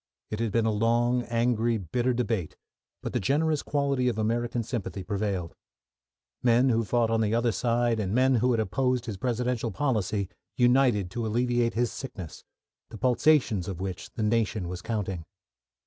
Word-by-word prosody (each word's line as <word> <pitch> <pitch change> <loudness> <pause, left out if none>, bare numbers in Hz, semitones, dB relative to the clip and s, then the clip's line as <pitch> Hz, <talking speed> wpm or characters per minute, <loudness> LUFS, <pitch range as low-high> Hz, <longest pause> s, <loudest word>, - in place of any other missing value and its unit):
It 105 - -3
had 115 -2 0
been 115 +1 +2
a 110 - +2
long, 120 +3 +2
angry, 115 -1 +1
bitter 120 +7 -1
debate, 115 -8 -2 0.5
but - - -4
the - - +1
generous 150 - +1
quality 140 -3 0
of 120 -3 0
American 115 +2 0
sympathy 105 -5 -4
prevailed. 100 -3 -2 0.9
Men 125 +2 +4
who 115 -1 +2
fought 115 +1 +1
on 115 0 +2
the 110 0 +1
other 120 0 +2
side 120 +1 +1
and 95 -3 -1
men 130 +4 +3
who 125 +3 +2
had 120 -2 +2
opposed 125 +4 0
his 110 -5 -5
Presidential 125 +1 -1
policy 110 -8 -1 0.3
united 120 -6 +3
to 115 +2 -2
alleviate 120 +1 +1
his 120 0 +1
sickness, 95 - -8 0.5
the 115 - -9
pulsations 125 - +2
of 95 -3 -5
which 95 -2 -5
the 110 - -2
nation 105 -3 0
was 90 0 -5
counting. 95 -6 -3
115 Hz, 165 wpm, -27 LUFS, 105-125 Hz, 0.9 s, Men